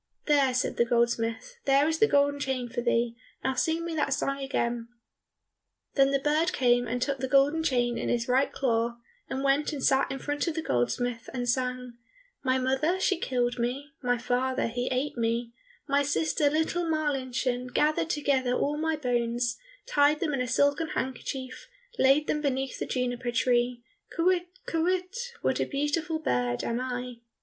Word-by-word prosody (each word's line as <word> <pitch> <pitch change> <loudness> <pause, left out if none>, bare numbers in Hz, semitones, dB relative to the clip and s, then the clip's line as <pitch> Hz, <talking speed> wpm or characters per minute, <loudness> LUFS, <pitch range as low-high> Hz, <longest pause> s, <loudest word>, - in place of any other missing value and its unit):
"There," 285 -3 +4
said 250 - 0
the 235 - +4
goldsmith, 235 - 0
"there 275 +2 +4
is 320 0 0
the 440 - +6
golden 285 -2 +2
chain 265 -3 -2
for 240 0 -3
thee, 235 -1 +1 0.3
now 265 - +1
sing 325 +5 0
me 340 - -3
that 285 -3 +1
song 275 -1 -2
again." 240 -4 -2 1.1
Then 275 -1 +4
the 275 - +2
bird 305 +5 +1
came 245 -1 +3
and 245 +2 -2
took 275 +1 -1
the 260 - -2
golden 280 +4 +4
chain 245 -6 +1
in - - -2
his 235 -1 0
right 260 +2 +2
claw, 235 -2 0 0.3
and 265 +1 -3
went 275 +3 +2
and 285 -4 -5
sat 270 0 +3
in 270 - -3
front 290 +4 -2
of 330 - -1
the 325 - -2
goldsmith, 230 - -1
and 245 -1 -2
sang, 250 -1 -2 0.4
"My 260 -1 +2
mother 265 +8 +1
she 380 -2 +1
killed 245 -3 -1
me, 265 +5 -2
My 245 -1 +1
father 255 +2 0
he 245 +2 -2
ate 260 +2 -1
me, 230 0 -1 0.4
My 280 0 +3
sister, 290 +1 +1
little 320 +3 0
Marlinchen, 260 -5 -1
Gathered 305 +5 +1
together 275 -5 +1
all 290 +3 0
my 320 0 0
bones, 240 -3 0 0.3
Tied 290 +1 +3
them 310 -4 -1
in 270 - 0
a 250 - -1
silken 285 +5 +2
handkerchief, 260 0 -4 0.3
Laid 275 +3 +5
them 300 - -1
beneath 270 -2 -1
the - - -3
juniper 245 -1 -2
tree, 240 0 +1 0.3
Kywitt, 355 +1 +2 0.2
kywitt, 370 +8 -1
what - - +1
a - - +1
beautiful 315 +3 -1
bird 125 - -1
am 235 +1 -1
I!" 250 -1 -4
265 Hz, 175 wpm, -28 LUFS, 245-295 Hz, 1.1 s, the